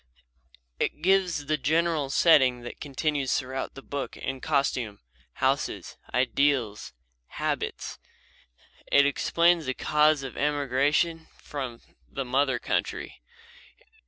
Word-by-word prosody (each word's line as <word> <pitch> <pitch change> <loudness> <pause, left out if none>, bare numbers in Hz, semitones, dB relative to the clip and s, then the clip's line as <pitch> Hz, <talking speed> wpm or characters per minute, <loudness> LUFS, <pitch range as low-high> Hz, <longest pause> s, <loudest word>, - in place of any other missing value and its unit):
It 155 - -2
gives 180 -5 +2
the 155 +1 0
general 155 0 +1
setting 135 -5 +5
that 120 - -9
continues 145 -1 0
throughout 130 0 -4
the 135 - -10
book 140 -1 -5
in 135 0 -4
costume, 130 -8 -1 0.3
houses, - - -1 0.2
ideals, 125 -4 +1 0.3
habits. - - -3 0.9
It 140 0 +6
explains 170 +3 +2
the 130 - -1
cause 150 -1 +3
of 135 - -6
the - - -8
emigration 145 +3 +1
from 130 -5 -6 0.3
the 135 - -4
mother 130 +1 +1
country. - - -3
140 Hz, 110 wpm, -27 LUFS, 130-155 Hz, 0.9 s, It